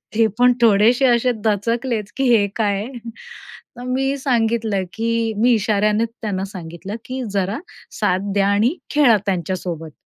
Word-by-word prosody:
ते 225 0 +4
पण 250 0 +6
थोडेसे 230 +4 +4
असे 245 +1 +3
दचकलेच, 220 +1 -1
की 270 - 0
हे 205 -2 +2
काय 205 -3 +1
आहे. 240 -1 -8 0.7
तर, 245 - -8
मी 270 +2 -1
सांगितलं 225 -6 0
की 230 0 -1
मी 240 +3 +3
इशाऱ्याने 215 0 +1
त्यांना 215 -5 -4
सांगितलं, 185 +1 -8
की 260 +1 -5
जरा 200 +4 -1 0.4
साथ 190 +2 0
द्या 200 -1 +2
आणि 220 - +2 0.2
खेळा 250 -7 +5
त्यांच्यासोबत. 175 -3 -3
220 Hz, 145 wpm, -20 LUFS, 200-240 Hz, 0.7 s, पण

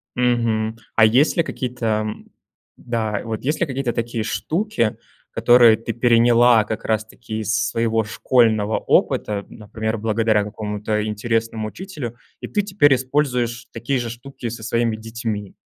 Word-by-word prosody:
Мгм. 115 -3 0 0.2
А 110 - +6
есть 130 +10 +3
ли 170 - +4
какие-то, 125 -5 -5 0.2
м 105 - -7 0.5
Да. 110 -4 -2
Вот 110 -1 -4
есть 150 +4 -1
ли - - +2
какие-то 135 -3 -2
такие 115 -1 -2
штуки, 155 - -1 0.3
которые 120 -2 +6
ты 115 +1 -5
переняла 120 -1 +5
как 110 +1 -5
раз-таки 110 +1 -3
из 110 0 -1 0.2
своего 115 -1 0
школьного 110 -1 +2
опыта, 100 -1 +1
например, 110 +1 -4
благодаря 110 -1 +1
какому-то 105 0 -3
интересному 110 0 -2
учителю, 145 - -7 0.2
и - - -6
ты 205 - 0
теперь 185 -8 +3
используешь 125 -3 -1
такие 120 +4 -1
же 120 -1 -3
штуки 125 0 -7
со 115 -1 -7
своими 115 -1 0
детьми? 110 -2 -5
115 Hz, 140 wpm, -21 LUFS, 110-125 Hz, 0.5 s, А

